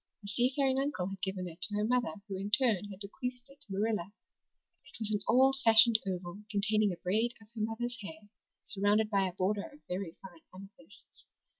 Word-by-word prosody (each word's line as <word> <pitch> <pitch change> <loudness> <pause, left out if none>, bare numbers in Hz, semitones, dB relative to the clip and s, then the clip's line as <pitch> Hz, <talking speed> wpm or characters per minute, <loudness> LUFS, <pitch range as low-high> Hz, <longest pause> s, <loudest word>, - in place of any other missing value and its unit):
A - - -7
seafaring 260 +5 +1
uncle 270 -10 -1
had 195 -1 -8
given 190 -2 -3
it 170 +1 -11
to 205 +3 -2
her 210 0 +1
mother 245 0 +1
who 195 - -4
in 195 +2 -4
turn 210 -4 +3
had 195 0 -10
bequeathed 250 +5 -6
it 280 +1 -20
to 220 - -15
Marilla. 205 -2 -1 0.7
It - - -16
was 220 -1 -1
an 210 - +1
old 265 +4 +5
fashioned 225 0 +7
oval, 180 +1 -4
containing 215 -1 +2
a 175 - -5
braid 220 +7 0
of 220 -1 -18
her 225 - -5
mother's 240 +2 -3
hair, 205 +2 -9 0.4
surrounded 210 +2 +2
by 195 -2 +3
a 180 - -5
border 200 +3 -1
of 295 +1 -17
very 180 -2 -4
fine 175 -4 -12
amethysts. 200 +10 -15
210 Hz, 195 wpm, -32 LUFS, 195-240 Hz, 0.7 s, fashioned